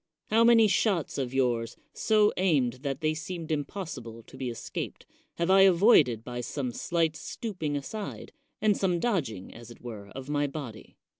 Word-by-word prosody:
How 225 +1 +5
many 230 -2 +7
shots 195 - +1
of 130 -2 -2
yours, 120 -3 0 0.2
so 215 -1 +3
aimed 135 -10 +1
that 140 0 -3
they 155 0 +1
seemed 165 +1 -6
impossible 140 - -5
to - - -15
be 130 -1 -3
escaped, 115 - -6 0.3
have 170 +2 +1
I 195 0 +7
avoided 170 - +5
by 120 0 -5
some 130 0 -3
slight 165 +5 0
stooping 165 -4 -4
aside, 200 +9 -6 0.3
and 210 -1 +3
some 180 -3 +1
dodging, 140 - -2
as 120 0 -12
it 120 - -13
were, 110 -5 -8
of 135 0 -7
my 145 0 0
body? 135 -7 -8
150 Hz, 165 wpm, -28 LUFS, 125-190 Hz, 0.3 s, many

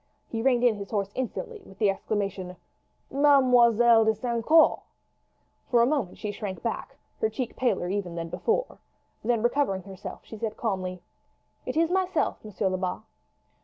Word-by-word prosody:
He 225 - -3
reined 250 -1 +2
in 235 -4 +4
his 200 -1 -7
horse 200 -2 -2
instantly, 400 - -4
with 195 - -16
the 205 -3 +3
exclamation: 195 -2 -3 0.6
"Mademoiselle 245 -5 +5
de 220 0 +2
St. 235 0 -2
Caux!" 320 +5 +5 0.9
For 235 -2 +5
a - - +5
moment 260 -9 -1
she 210 - -4
shrank 200 -2 -6
back, - - -4 0.2
her 440 - +1
cheek 255 - -4
paler 220 -8 0
even 185 -2 -3
than 165 0 -4
before; 460 - -1 0.4
then 230 0 +1
recovering 240 -7 +1
herself 190 -1 -9
she 220 - -10
said 220 -1 -3
calmly: 185 -5 -3 0.6
"It - - -2
is 330 +1 +3
myself, 375 0 0
Monsieur 210 -2 -2
Lebat." 185 +2 -3
225 Hz, 160 wpm, -27 LUFS, 195-255 Hz, 0.9 s, Mademoiselle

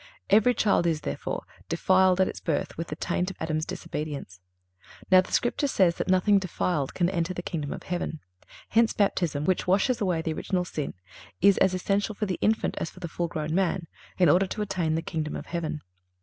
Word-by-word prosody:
Every 220 +4 +5
child 200 -5 +2
is, 160 -2 0
therefore, - - -4 0.3
defiled 185 0 +3
at 190 - +4
its - - -5
birth 155 -4 -2
with 165 +1 -4
the 150 - -5
taint 180 +2 -1
of 190 - -9
Adam's 155 -1 -2
disobedience. 145 -12 -5 0.7
Now, 185 0 +8
the - - -11
Scripture 245 +4 +1
says 185 -9 +3
that - - -2
nothing 190 +2 +4
defiled 175 -5 -2
can 175 - +2
enter 180 0 -1
the 175 - -4
kingdom 155 -6 -3
of - - -6
heaven.(344) 150 - -6 0.2
Hence 230 +1 +3
Baptism, 170 -7 0
which 185 +1 +1
washes 215 +6 +2
away 180 -5 0
original 180 +3 -1
sin, 150 -4 -4 0.4
is 200 +1 +5
as 190 -1 +3
essential 200 +3 0
for 210 - -1
the 185 -3 -3
infant 220 +1 +1
as - - -2
for - - -15
the 175 - -4
full 170 +1 -2
grown 155 -2 -3
man, 185 -1 +1 0.3
in 180 - +5
order 180 +6 +4
to 210 - -3
attain 180 -6 -1
the 165 - -1
kingdom 155 -3 -3
of - - -6
heaven. 160 -3 -3
180 Hz, 200 wpm, -27 LUFS, 160-195 Hz, 0.7 s, Now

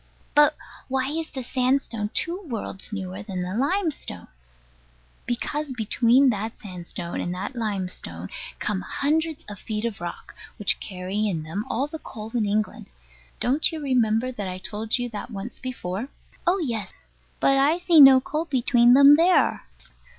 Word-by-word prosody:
But 295 0 +5 0.3
why 265 0 0
is 320 +1 -3
the 260 - -6
sandstone 250 -4 0
two 350 +3 -1
worlds 225 -5 -5
newer 190 -1 -5
than 190 -3 -4
the 180 +1 -4
limestone? 285 - -2 1.0
Because 290 +4 -2
between 240 +3 +3
that 220 +1 -4
sandstone 175 -4 -6
and 175 - -3
that 200 +8 -5
limestone 200 -6 -4 0.3
come 205 -3 -2
hundreds 310 - -1
of 205 -2 -8
feet 215 0 -3
of 225 -6 -4
rock, 175 0 -7 0.2
which 210 - +4
carry 195 +2 -3
in 165 -6 -2
them 195 +8 -4
all 265 - 0
the 310 +2 -7
coal 220 -5 -9
in 225 -4 +1
England. 210 - -2 0.5
Don't 275 +8 +1
you 320 - -5
remember 250 -3 +1
that 210 -6 -5
I 185 0 -4
told 215 +4 -2
you 245 0 -2
that 215 +1 -6
once 215 +1 -7
before? 235 -3 -4 0.4
Oh 360 +3 +4
yes. 235 - -3 0.5
But 275 - +4
I 295 +5 +4
see 350 -3 +6
no 270 -1 +10
coal 305 +5 -3
between 245 -4 +4
them 280 +2 +8
there. 355 +3 +3
235 Hz, 160 wpm, -24 LUFS, 205-280 Hz, 1.0 s, no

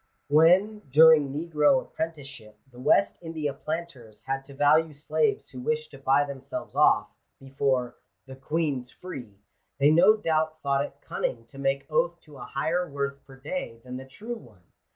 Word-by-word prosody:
When, 180 +8 +4
during 155 0 +6
negro 150 -2 +2
apprenticeship, 135 -10 -7
the 125 - -14
West 195 +9 +2
India 160 -4 -3
planters 135 -9 -7
had 135 0 -3
to 140 0 -13
value 155 +3 +3
slaves 410 - -1
who - - -9
wished 465 0 -2
to - - -12
buy 140 +2 +3
them 140 -2 -8
selves 135 0 -7
off, - - +4 0.3
before 135 -2 -1
" - - -51
the 130 0 -10
Queen's 140 -2 -2
free," 125 - -9 0.4
they 140 +2 +5
no 190 +7 +6
doubt 155 -5 0
thought 140 0 +1
it - - -10
cunning 115 - -3
to 135 +4 -14
make 135 0 0
oath 170 +2 0
to 150 -2 -15
a - - -8
higher 170 +5 -1
worth 140 0 -4
per 135 - -13
day 135 - -5
than 125 0 -7
the 130 - -9
true 220 - -7
one. 105 -8 -19
145 Hz, 175 wpm, -27 LUFS, 135-165 Hz, 0.4 s, during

